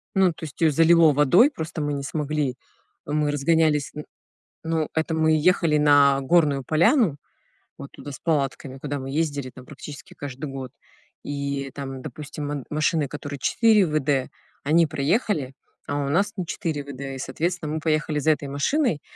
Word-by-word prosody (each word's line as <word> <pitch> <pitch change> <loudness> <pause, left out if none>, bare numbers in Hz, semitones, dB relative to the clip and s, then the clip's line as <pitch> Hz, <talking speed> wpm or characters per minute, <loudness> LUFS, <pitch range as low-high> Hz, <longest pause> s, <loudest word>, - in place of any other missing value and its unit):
Ну, 190 -1 +5
то 170 - -14
есть 145 - -11
её 160 -2 +5
залило 165 +1 +5
водой, 175 - +5
просто 160 - -5
мы 145 0 -1
не 140 -1 -3
смогли, 150 -2 -2 0.5
а - - -6
мы 150 -1 +1
разгонялись. 150 0 +2
Н 150 - -6 0.6
ну, 160 -2 -1
это 160 +1 -1
мы 160 0 +2
ехали 165 -1 +3
на 145 -2 +5
горную 145 -2 +2
поляну, 170 - +3 0.6
вот 140 - -9
туда 145 - -9
с 135 - -9
палатками, 140 -4 -2
куда 145 +1 -4
мы 135 0 -6
ездили 145 -2 -2
там 125 0 -14
практически 145 0 -10
каждый 140 +1 -7
год. 130 -2 -7 0.5
И 140 -1 -3
там, 135 -2 -6
допустим, 150 0 -7
ман 145 -3 -4
машины, 155 0 +1
которые 145 0 -7
4 220 - +4
ВД, 145 -3 0 0.3
они 165 +4 +4
проехали, 145 - 0 0.3
а 145 0 -1
у - - -2
нас 200 +7 +1
не 185 - -2
4 160 -4 -3
ВД. 140 -1 -9
И, 135 -1 -5
соответственно, 160 +4 -3
мы 160 - -2
поехали 155 -1 0
за 155 +2 +3
этой 150 -2 -2
машиной, 150 - 0
150 Hz, 170 wpm, -24 LUFS, 140-160 Hz, 0.6 s, Ну